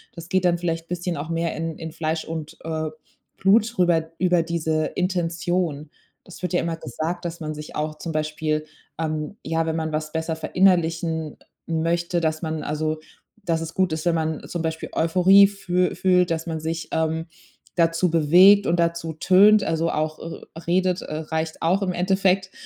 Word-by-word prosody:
das 170 0 -9
geht 185 -1 +1
dann 175 -1 +3
vielleicht 165 -1 -2
bisschen 175 0 -2
auch 150 +3 -5
mehr 165 0 -1
in 165 0 -4
in 160 -1 -6
Fleisch 160 0 -2
und, 160 -2 -6
äh, 160 -1 -2 0.5
Blut 215 +4 +3
rüber, 165 -2 +2
über 180 -2 +3
diese 160 -2 -1
Intention. 175 -4 -1 0.3
Das 180 - -13
wird 180 - -2
ja - - +3
immer 165 -1 -2
gesagt, 165 +7 -4
dass 170 0 -4
man 155 0 -4
sich 150 0 -9
auch 155 0 -2
zum 165 - -5
Beispiel, 155 0 -1 0.3
ähm, 155 +3 -3
ja, 165 +1 0
wenn 160 0 -1
man 160 -1 -2
was 155 0 -2
besser 160 0 -2
verinnerlichen, 165 -3 +1 0.3
äh, - - -6
möchte, 170 +1 0
dass 155 0 -1
man 160 -1 -2
also, 155 +1 -2 0.5
dass 165 -2 +1
es 165 0 -6
gut 185 -3 +1
ist, 160 +2 -4
wenn 170 - +3
man 160 -1 -2
zum 175 - -4
Beispiel 160 0 -3
Euphorie 185 +4 +6
füh 180 -2 -1
fühlt, 180 -2 +3
dass 165 +1 -1
man 160 -1 -3
sich, 160 +1 -4
ähm, 160 0 0 0.5
dazu 165 0 +2
bewegt 180 +6 +6
und 170 +1 +1
dazu 170 -1 0
tönt, 200 +6 +5
also 165 +1 0
auch, 155 0 -2
äh, 165 - -8 0.2
redet, 185 0 +1
äh, 155 - -6
reicht 160 0 -3
auch 185 +5 +2
im 185 - 0
Endeffekt. 190 +1 +1
165 Hz, 185 wpm, -23 LUFS, 160-180 Hz, 0.5 s, Euphorie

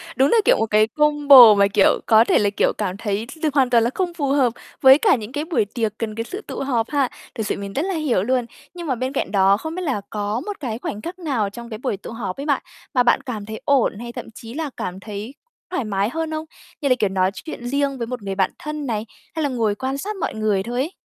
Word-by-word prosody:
Đúng 270 +2 +3
là 465 - +4
kiểu - - +5
một 225 - +2
cái 215 +1 +4
combo 285 -4 +7
mà, 200 0 +4
kiểu, 200 0 +3
có 220 0 +6
thể - - +3
là, 205 -1 +2
kiểu, 200 - +1
cảm 195 -3 -2
thấy 210 +1 -2 0.2
th - - +3
hoàn 270 -3 +3
toàn 235 -2 +4
là 235 - +2
không 360 -2 -1
phù 300 -5 -2
hợp 270 -4 +2 0.3
với 265 0 +9
cả - - +4
những 220 -2 -7
cái 295 +3 -3
buổi 320 - +1
tiệc 215 0 -2
cần 220 -2 -4
cái 230 - -2
sự 385 - -7
tụ - - -5
họp 240 -4 -1
ha. 280 -4 +1 0.3
Thực 220 - -3
sự - - -1
mình 200 0 -6
rất 275 - 0
là 385 - -2
hiểu 295 - 0
luôn. 250 +2 +1 0.3
Nhưng 345 -2 -7
mà 260 - 0
bên 255 +3 -3
cạnh 270 - -2
đó 195 0 +4
không 315 +8 -6
biết 365 - -3
là 265 - -1
có 210 +2 -2
một 415 -1 -5
cái 240 -5 -4
khoảnh 210 -3 -5
khắc 365 +2 -7
nào 255 - -1
trong 235 +3 -10
cái 215 - -6
buổi 220 -4 -2
tụ 205 - -9
họp 210 -5 -5
ấy 280 - -5
bạn, 285 -3 +1 0.3
mà 250 - +4
bạn 240 - +3
cảm 215 -5 -6
thấy 220 0 -7
ổn 265 -6 +2
hay 240 0 -6
thậm - - -7
chí 230 0 -9
là 310 0 -3
cảm 185 +1 -4
thấy 210 +4 -7 0.4
thoải 315 -9 -1
mái 200 -1 -1
hơn 320 +3 -3
không? 310 0 -3 0.4
Như 280 - +1
là, 255 - +5
kiểu, 210 -2 +2
nói 190 0 +1
chuyện 245 -2 -7
riêng 275 +1 0
với 235 - -4
một 250 -1 -5
người 195 -1 -4
bạn 190 -1 +1
thân 300 -1 -5
này? 220 -2 -2 0.3
Hay 320 - -1
là 290 - +1
ngồi 225 -5 0
quan 265 +4 -3
sát 420 +8 -4
mọi 380 - -3
người 210 -3 0
thôi 240 +3 -5
ấy? 315 - -3
240 Hz, 275 wpm, -21 LUFS, 210-285 Hz, 0.4 s, với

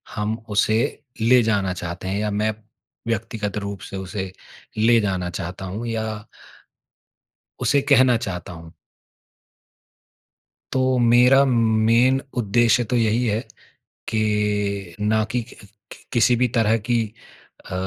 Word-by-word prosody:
हम 105 +1 -2
उसे 110 +6 +1 0.2
ले 125 +2 +5
जाना 100 -4 0
चाहते 85 +1 -6
हैं 100 +2 -1
या 105 0 -1
मैं 105 +1 0 0.5
व्यक्तिगत 110 -2 -3
रूप 100 -1 -5
से 100 - -7
उसे 95 0 -5 0.5
ले 115 +2 +4
जाना 95 -3 -2
चाहता 90 +2 -6
हूँ 105 +6 -5
या 110 -2 -4 1.3
उसे 140 - +2
कहना 130 -2 +5
चाहता 90 -5 -5
हूँ। 80 -1 -11 2.0
तो 130 -1 +2
मेरा 125 +3 +5
मेन 115 +1 +3 0.2
उद्देश्य 120 +2 +3
तो 125 - +2
यही 115 +1 +1
है 110 +1 0 0.7
कि 105 -4 -1
ना 110 +1 +1
कि 125 - 0
कि 120 - -15 0.4
कि - - -13
किसी 120 0 +4
भी 125 +1 +2
तरह 110 0 +3
की 120 - +3 0.7
अ, - - -8
110 Hz, 130 wpm, -22 LUFS, 100-120 Hz, 2.0 s, ले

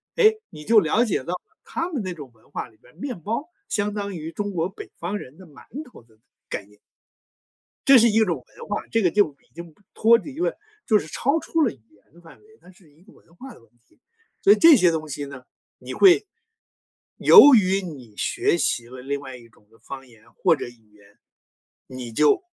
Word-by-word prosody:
诶， 435 -2 +4
你 150 - -12
就 225 0 +6
了 205 +7 +1
解 215 - -1
到 130 - -13
了 180 - -4 0.2
他 335 +2 -4
们 285 -9 -3
那 185 - -4
种 145 -7 -11
文 110 - -28
化 - - -5
里 110 - -25
边 - - -23
儿， - - -29
面 245 -3 -6
包 230 - -4 0.2
相 205 -1 -1
当 200 -2 -5
于 160 0 -7
中 205 +2 -4
国 170 -1 -1
北 190 - -11
方 185 +5 -4
人 145 -3 -12
的 185 - -14
馒 145 -3 -17 0.3
头 - - -15
的 110 -2 -28 0.3
概 100 - -5
念。 105 0 -24 1.1
这 275 - +9
是 235 -1 +5
一 220 - +2
种 170 - 0 0.2
文 - - -10
化， 205 - -4
这 225 - +1
个 180 - +3
就 200 -4 +2 0.2
已 - - -39
经 170 -1 -10
不 205 - -31
脱 230 +1 +5
离 275 +5 -10
了 360 - -2 0.3
就 215 -2 +3
是 - - -9
超 275 - 0
出 325 0 -2
了 290 - +2
语 135 - -18
言 105 +6 -29
的 170 - -19
范 165 -1 -17
围， 425 - -26
它 - - -19
是 175 -4 -21
一 155 +4 -26
个 210 - -20
文 170 - -25
化 265 -1 -11
的 - - -19
问 - - -27 0.2
题。 - - -31 0.4
所 395 - +5
以 - - +6
这 330 -2 +8
些 180 -8 +4
东 155 -1 -4
西 145 0 -6
呢， 135 -3 -10 0.3
你 - - -9
会 390 +2 +5 0.9
由 290 - +8
于 195 -2 +2
你 135 - -10
学 - - 0
习 120 -7 -1
了 125 +1 -11
另 140 +2 -4
外 130 -2 -9
一 120 - -17
种 105 -2 -28
的 115 - -24
方 135 +3 -10
言 115 -3 -22
或 180 - +2
者 - - -5
语 115 -3 -18
言， 100 -1 -23 0.7
你 125 -2 -8
就 150 - +2
175 Hz, 250 characters per minute, -23 LUFS, 130-225 Hz, 1.1 s, 这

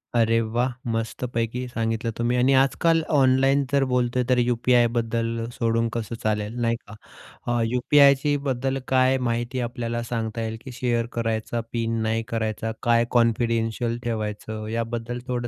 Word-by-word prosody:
अरे 115 0 +3
वा! 115 +2 -1 0.3
मस्तपैकी 115 +2 -3
सांगितलं 115 -1 -2
तुम्ही 120 +1 +1
आणि 130 +2 +4
आजकाल 165 +4 +2 0.2
ऑनलाईन 135 +1 +4
जर 140 -1 +3
बोलतोय 125 0 +1
तर 125 - +4
यू-पी-आयबद्दल 115 -1 +1
सोडून 115 0 0
कसं 115 0 -3
चालेल 105 +1 -1
नाही 115 0 +2
का, 110 -2 -13 0.5
अ, 120 0 +1
यू-पी-आयची 140 +4 +4
बद्दल 135 +1 -1
काय 130 0 +3
माहिती 120 +2 -2
आपल्याला 120 -1 -3
सांगता 115 -1 -3
येईल, 110 0 -3
की 130 - -8
शेअर 120 -1 0
करायचा 115 0 -2
पिन, 115 -1 -1
नाही 115 +1 0
करायचा? 110 0 -2
काय 120 -1 +3
कॉन्फिडेन्शियल 115 0 +1
ठेवायचं? 110 -1 -4
याबद्दल 115 +1 -3
थोडं 120 -1 -2
115 Hz, 140 wpm, -24 LUFS, 115-125 Hz, 0.5 s, आणि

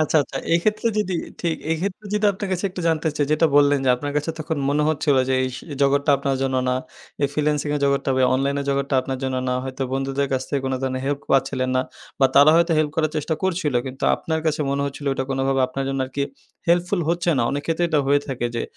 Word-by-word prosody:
আচ্ছা, 155 +1 +2
আচ্ছা। 135 - -8 0.2
এক্ষেত্রে 215 +6 +1
যদি 190 -3 0 0.3
ঠিক, 170 -2 0 0.2
এই 165 - +2
ক্ষেত্রে 200 +2 -4
যদি 210 0 0
আপনার 195 0 -5
কাছে 185 +2 -2
একটু 180 - -6
জানতে 160 0 +1
চাই, 145 - +1
যেটা 160 +2 +4
বললেন 145 -1 +5
যে, - - +2
আপনার 145 +2 -4
কাছে 150 +3 0
তখন 155 0 -3
মনে 150 +1 +2
হচ্ছিলো 145 -3 +2
যে, 130 - +2
এই 130 - 0
স - - -7 0.2
জগৎটা 140 +1 +3
আপনার 135 0 -1
জন্য 130 -1 0
না। 125 - +2 0.5
এই 140 - +5
ফ্রিল্যান্সিং 150 0 0
এর 145 - -1
জগৎটা, 140 0 +1
ভাই 130 - +4
অনলাইনের 140 +1 0
জগৎটা, 140 0 -1
আপনার 130 0 -4
জন্য 130 -1 -1
না 125 - +1
হয়তো 130 0 -4
বন্ধুদের 135 +1 -1
কাছ 130 0 0
থেকে 140 - -1
কোনো 130 0 -1
ধরণের 130 0 -2
হেল্প 140 0 -1
পাচ্ছিলেন 135 -1 +1
না - - +3 0.4
বা 135 - +7
তারা 145 +2 +8
হয়তো 170 0 +3
হেল্প 155 -1 +1
করার 155 -1 +1
চেষ্টা 155 +1 -1
করছিলো, 170 -8 0
কিন্তু 130 +1 -5
আপনার 160 -1 -2
কাছে 155 0 0
মনে 140 0 0
হচ্ছিলো 140 +1 -4
এটা 130 - -2
কোনোভাবে 135 0 +1
আপনার 135 +1 -4
জন্য 135 0 -2
আরকি 140 +2 -3 0.5
হেল্পফুল 175 +2 +2
হচ্ছে 175 +1 0
না। - - +3
অনেক 145 +1 -2
ক্ষেত্রে 165 +1 +1
এটা 155 -2 +2
হয়ে 145 +1 +4
থাকে 125 -3 -2
যে, 115 - -1
140 Hz, 235 wpm, -22 LUFS, 135-160 Hz, 0.5 s, তারা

